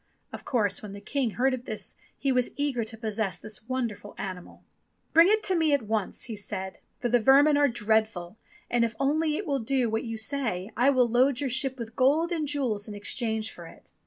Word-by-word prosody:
Of -, -, -8 dB
course, 210 Hz, -6 st, 0 dB
when 205 Hz, -2 st, -8 dB
the 200 Hz, -, -8 dB
King 255 Hz, +4 st, -1 dB
heard 255 Hz, 0 st, 0 dB
this 215 Hz, -, -4 dB, 0.2 s
he 275 Hz, -, 0 dB
was 250 Hz, -1 st, +2 dB
eager 285 Hz, -5 st, -1 dB
to 225 Hz, +1 st, -8 dB
possess 220 Hz, -3 st, -2 dB
this 215 Hz, 0 st, -6 dB
wonderful 235 Hz, -5 st, -4 dB
animal. 185 Hz, -2 st, -7 dB, 0.5 s
"Bring 330 Hz, +2 st, +8 dB
it 430 Hz, 0 st, +3 dB
to 380 Hz, -, +2 dB
me 320 Hz, -3 st, +2 dB
at 280 Hz, -4 st, +2 dB
once," 215 Hz, -2 st, -2 dB
he 230 Hz, -, -4 dB
said; 190 Hz, -2 st, -5 dB, 0.2 s
*'for 245 Hz, -, -1 dB
the 245 Hz, +1 st, +4 dB
vermin 275 Hz, +5 st, +6 dB
are 290 Hz, 0 st, +4 dB
dreadful, 220 Hz, -5 st, 0 dB, 0.3 s
and 240 Hz, -1 st, +2 dB
if 230 Hz, -1 st, -1 dB
only 305 Hz, +2 st, +1 dB
it 410 Hz, -, -4 dB
will 280 Hz, -3 st, 0 dB
do 245 Hz, -1 st, 0 dB
what 220 Hz, -, -1 dB
you 225 Hz, -1 st, -4 dB
say, 220 Hz, -5 st, -2 dB
I 245 Hz, +4 st, +4 dB
will 255 Hz, -3 st, +4 dB
load 250 Hz, +2 st, +3 dB
your 275 Hz, -3 st, -1 dB
ship 265 Hz, +1 st, +1 dB
with 230 Hz, -1 st, -7 dB
gold 295 Hz, +7 st, +3 dB
and 315 Hz, -3 st, -1 dB
jewels 250 Hz, -8 st, -1 dB
in 210 Hz, -, -7 dB
exchange 220 Hz, +1 st, -2 dB
for 170 Hz, -1 st, -11 dB
it." -, -, -17 dB
240 Hz, 215 wpm, -27 LUFS, 215-275 Hz, 0.5 s, Bring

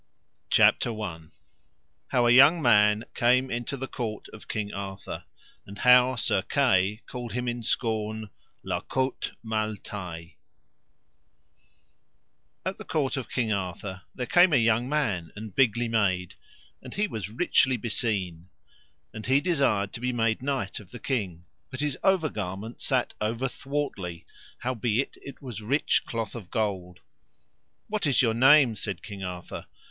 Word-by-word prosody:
CHAPTER 115 Hz, -3 st, +4 dB
I. 90 Hz, -6 st, -4 dB, 0.9 s
How 125 Hz, -2 st, +2 dB
a 120 Hz, -, +5 dB
young 140 Hz, +7 st, +8 dB
man 105 Hz, -5 st, +4 dB
came 125 Hz, +2 st, +3 dB
into 120 Hz, +3 st, -3 dB
the 135 Hz, +1 st, -4 dB
court 110 Hz, -5 st, -5 dB
of 105 Hz, -, -13 dB
King 105 Hz, -2 st, -3 dB
Arthur, 100 Hz, 0 st, -6 dB, 0.4 s
and 100 Hz, -, -9 dB
how 125 Hz, +2 st, +6 dB
Sir 105 Hz, -4 st, +1 dB
Kay 105 Hz, -3 st, +2 dB
called 120 Hz, -2 st, -6 dB
him 125 Hz, +1 st, -2 dB
in 120 Hz, 0 st, -2 dB
scorn 110 Hz, -2 st, -2 dB, 0.3 s
La -, -, -2 dB
Cote 130 Hz, 0 st, -2 dB
Male 110 Hz, -1 st, -1 dB
Taile. 85 Hz, -6 st, -7 dB, 2.4 s
At -, -, -3 dB
the -, -, -6 dB
court 145 Hz, -3 st, -1 dB
of 130 Hz, -3 st, -5 dB
King 115 Hz, -4 st, 0 dB
Arthur 95 Hz, 0 st, -4 dB
there 125 Hz, -, -3 dB
came 175 Hz, +6 st, +5 dB
a -, -, +6 dB
young 115 Hz, +1 st, +2 dB
man 105 Hz, -, -1 dB
and 105 Hz, -1 st, -8 dB
bigly 120 Hz, -1 st, +2 dB
made, 95 Hz, -6 st, 0 dB, 0.5 s
and -, -, -10 dB
he 205 Hz, +1 st, +2 dB
was 105 Hz, -, -5 dB
richly 130 Hz, 0 st, +2 dB
beseen: 95 Hz, -7 st, -2 dB, 0.6 s
and 110 Hz, +1 st, -7 dB
he 135 Hz, +2 st, +5 dB
desired 135 Hz, -, +1 dB
to -, -, -5 dB
be 125 Hz, +1 st, -1 dB
made 115 Hz, -2 st, 0 dB
knight 135 Hz, -7 st, -2 dB
of 100 Hz, -4 st, -14 dB
the 125 Hz, -, -9 dB
king, 95 Hz, -11 st, -3 dB, 0.2 s
but 130 Hz, -, -7 dB
his 150 Hz, -3 st, 0 dB
over 190 Hz, -5 st, +3 dB
garment 105 Hz, +3 st, -5 dB
sat 130 Hz, -3 st, +1 dB
over 115 Hz, +5 st, 0 dB
thwartly, 125 Hz, -, -4 dB, 0.4 s
howbeit 120 Hz, 0 st, -1 dB
it 140 Hz, -, -11 dB
was 120 Hz, -5 st, -6 dB
rich 140 Hz, +8 st, +1 dB
cloth 115 Hz, -3 st, -3 dB
of 105 Hz, -7 st, -8 dB
gold. 95 Hz, -5 st, -2 dB, 0.9 s
What 210 Hz, -6 st, -1 dB
is 135 Hz, -1 st, +4 dB
your 115 Hz, -2 st, +3 dB
name? 130 Hz, +1 st, +6 dB
said 100 Hz, -2 st, -4 dB
King 100 Hz, -3 st, -7 dB
Arthur. 90 Hz, -1 st, -6 dB
115 Hz, 150 wpm, -27 LUFS, 100-130 Hz, 2.4 s, young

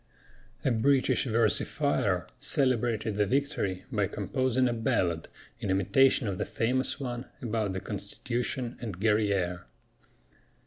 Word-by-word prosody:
A 135 Hz, -, +3 dB
British 130 Hz, +4 st, +2 dB
versifier 115 Hz, -3 st, +1 dB
celebrated 120 Hz, -5 st, +2 dB
the 105 Hz, -1 st, +2 dB
victory 115 Hz, -8 st, -1 dB
by 105 Hz, -5 st, +1 dB
composing 130 Hz, +5 st, 0 dB
a 120 Hz, -, 0 dB
ballad 90 Hz, -7 st, 0 dB, 0.3 s
in 100 Hz, -, -4 dB
imitation 130 Hz, +6 st, +3 dB
of 95 Hz, -3 st, -3 dB
the -, -, +1 dB
famous 125 Hz, +6 st, 0 dB
one 125 Hz, -2 st, -4 dB
about 110 Hz, -5 st, -2 dB
the 95 Hz, -, -4 dB
Constitution 120 Hz, +4 st, -3 dB
and 105 Hz, -7 st, -6 dB
Guerrière. 100 Hz, -5 st, +1 dB
115 Hz, 120 wpm, -29 LUFS, 100-125 Hz, 0.3 s, A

